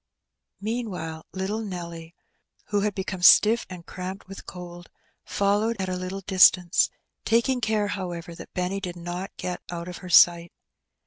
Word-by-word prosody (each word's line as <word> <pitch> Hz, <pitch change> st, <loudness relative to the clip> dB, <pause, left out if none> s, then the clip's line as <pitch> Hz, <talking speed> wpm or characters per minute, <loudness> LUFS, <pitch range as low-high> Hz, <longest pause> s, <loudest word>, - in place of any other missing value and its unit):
Meanwhile 200 Hz, -8 st, -4 dB
little 195 Hz, +4 st, -3 dB
Nelly, 170 Hz, -4 st, -7 dB, 0.5 s
who 205 Hz, -1 st, +1 dB
had 205 Hz, -1 st, -1 dB
become 190 Hz, -1 st, -4 dB
stiff 220 Hz, +6 st, +6 dB
and 180 Hz, -2 st, -9 dB
cramped 185 Hz, +1 st, -7 dB
with 195 Hz, +1 st, -10 dB
cold, 175 Hz, -1 st, -9 dB, 0.4 s
followed 205 Hz, +3 st, 0 dB
at 190 Hz, -1 st, -2 dB
a 185 Hz, -, -2 dB
little 185 Hz, +2 st, -5 dB
distance, 185 Hz, -2 st, +5 dB, 0.3 s
taking 235 Hz, +3 st, +2 dB
care, 215 Hz, -2 st, 0 dB
however, 175 Hz, -4 st, -5 dB
that -, -, -11 dB
Benny 185 Hz, +1 st, -1 dB
did 180 Hz, -3 st, -5 dB
not 175 Hz, +2 st, -5 dB
get 180 Hz, -1 st, -4 dB
out 170 Hz, 0 st, -5 dB
of 180 Hz, -, -7 dB
her 180 Hz, -, -10 dB
sight. 170 Hz, 0 st, +6 dB
185 Hz, 150 wpm, -25 LUFS, 175-205 Hz, 0.5 s, stiff